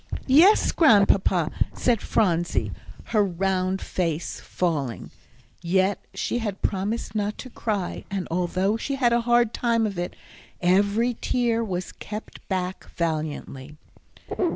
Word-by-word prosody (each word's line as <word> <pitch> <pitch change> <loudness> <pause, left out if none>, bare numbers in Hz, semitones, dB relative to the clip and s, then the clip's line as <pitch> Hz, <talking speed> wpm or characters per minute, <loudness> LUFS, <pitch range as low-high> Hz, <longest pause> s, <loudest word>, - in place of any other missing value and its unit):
"Yes, 330 +11 +6
Grandpapa," 200 - +4 0.2
said 235 -4 +1
Phronsie, 175 -5 +1 0.3
her 215 -3 +2
round 190 0 -1
face 170 -3 -2
falling. 145 -9 -2 0.5
Yet 190 +3 +1
she 240 - -1
had 205 -4 -4
promised 205 +2 -2
not 210 -1 -2
to 255 - -9
cry, 205 -7 -3
and, 195 -2 -3
although 185 +4 0
she 275 +4 -3
had 245 -3 +2
a 235 - +3
hard 240 -1 +4
time 230 -2 +1
of 200 -4 -3
it, 175 - -4 0.4
every 205 +6 +2
tear 235 -2 +1
was 185 -4 -4
kept 210 +1 -8
back 185 -1 -3
valiantly. 155 -3 -3
195 Hz, 125 wpm, -25 LUFS, 180-230 Hz, 0.5 s, Yes